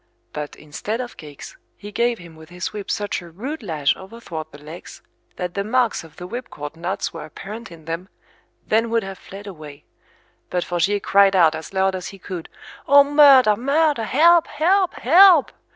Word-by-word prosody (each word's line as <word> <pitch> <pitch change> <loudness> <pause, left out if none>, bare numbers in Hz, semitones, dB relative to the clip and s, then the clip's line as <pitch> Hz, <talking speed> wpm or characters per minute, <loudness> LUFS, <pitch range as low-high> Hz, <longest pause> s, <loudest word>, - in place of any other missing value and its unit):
But, 150 -1 -6
instead 180 +9 -5
of 245 -2 -6
cakes, 145 -2 -11 0.2
he 205 0 -10
gave 235 +2 0
him 170 -3 -13
with 160 0 -15
his 180 +2 -5
whip 205 -2 -7
such 205 -3 -2
a 175 - -12
rude 255 - -6
lash 155 -7 0
overthwart 190 -6 -8
the 145 - -12
legs, 155 +4 -11 0.3
that 180 -1 -4
the 200 - -2
marks 235 0 0
of 160 -2 -16
the 180 - -8
whipcord 165 - -7
knots 180 +4 -3
were 165 - -7
apparent 210 +8 -9
in 160 -2 -14
them, 165 +4 -5 0.6
then 225 +2 +1
would 230 -1 +1
have 195 -1 -8
fled 200 +1 -11
away; 155 -6 -11 0.6
but 180 -1 -1
Forgier 180 +4 0
cried 195 0 +4
out 165 -4 +5
as 160 0 -7
loud 190 0 +1
as 185 -1 -5
he 195 - -10
could, 180 -3 -8 0.4
O, 285 0 +8
murder, 280 -6 +6
murder, 280 0 +1
help, 335 +7 +4
help, 360 +5 +1
help! 345 +2 +6
195 Hz, 185 wpm, -21 LUFS, 165-240 Hz, 0.6 s, O